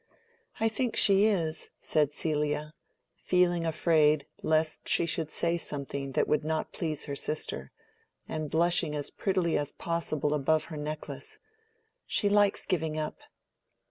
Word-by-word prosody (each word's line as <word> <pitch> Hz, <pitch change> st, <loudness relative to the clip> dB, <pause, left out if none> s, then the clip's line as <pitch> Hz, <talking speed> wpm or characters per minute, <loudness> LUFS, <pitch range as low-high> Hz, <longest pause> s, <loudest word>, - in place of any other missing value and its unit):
"I 225 Hz, -, +3 dB
think 235 Hz, +2 st, -1 dB
she 200 Hz, +1 st, +6 dB
is," 165 Hz, -6 st, -1 dB
said 150 Hz, -2 st, +1 dB
Celia, 150 Hz, 0 st, -1 dB, 0.5 s
feeling 175 Hz, -2 st, +2 dB
afraid 155 Hz, -2 st, +3 dB, 0.2 s
lest 155 Hz, 0 st, 0 dB
she -, -, +4 dB
should 160 Hz, -1 st, 0 dB
say 170 Hz, +2 st, 0 dB
something 140 Hz, -2 st, -5 dB
that -, -, +2 dB
would 150 Hz, -, +1 dB
not 155 Hz, 0 st, -2 dB
please 155 Hz, -3 st, -3 dB
her 140 Hz, -, -4 dB
sister, 105 Hz, -, -3 dB, 0.6 s
and 155 Hz, -1 st, -3 dB
blushing 170 Hz, -1 st, +2 dB
as 145 Hz, -1 st, -3 dB
prettily 185 Hz, -5 st, 0 dB
as 145 Hz, 0 st, -3 dB
possible 155 Hz, -3 st, -1 dB
above 150 Hz, +2 st, +2 dB
her -, -, -5 dB
necklace. 150 Hz, +1 st, -5 dB, 0.7 s
"She 205 Hz, -, +2 dB
likes 205 Hz, -1 st, +3 dB
giving 160 Hz, -3 st, -1 dB
up." 155 Hz, -1 st, -3 dB
155 Hz, 140 wpm, -29 LUFS, 150-170 Hz, 0.7 s, she